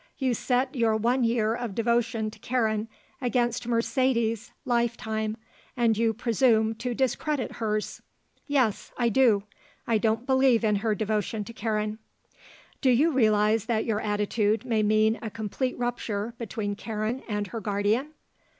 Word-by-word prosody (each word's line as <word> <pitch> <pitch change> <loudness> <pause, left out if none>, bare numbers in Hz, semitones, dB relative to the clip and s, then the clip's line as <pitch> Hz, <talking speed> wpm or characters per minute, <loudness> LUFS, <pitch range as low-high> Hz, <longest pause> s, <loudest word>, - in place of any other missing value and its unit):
"You 260 -3 +1
set 255 +4 0
your 230 -4 +2
one 240 +4 +1
year 230 -2 +2
of 235 -4 -4
devotion 230 -1 0
to - - -15
Karen 220 -3 0 0.3
against 240 -1 0
Mercedes's 235 -2 0
life 235 -2 +1
time, 220 0 -3 0.4
and 230 -2 +3
you 225 +1 +2
presume 225 -1 +2
to 245 -1 -2
discredit 265 +2 -1
hers." 215 -2 -2 0.5
"Yes. 260 -8 +1
I 240 -1 +2
do. 225 -4 +4 0.4
I 225 -2 +2
don't 225 +2 0
believe 260 -3 +3
in 210 -2 +3
her 215 +1 0
devotion 215 +1 -1
to 230 - -10
Karen." 215 -1 -2 0.8
"Do 265 - +3
you 280 +7 +4
realize 215 -4 +3
that 225 -2 0
your 220 -2 0
attitude 210 +2 0
may 225 -3 +1
mean 215 +1 +3
a 220 - -4
complete 225 +4 -3
rupture 235 -3 -2
between 210 -2 -3
Karen 220 +3 -3
and 210 -1 -1
her 225 - -3
guardian?" 210 +6 0
225 Hz, 150 wpm, -27 LUFS, 215-245 Hz, 0.8 s, do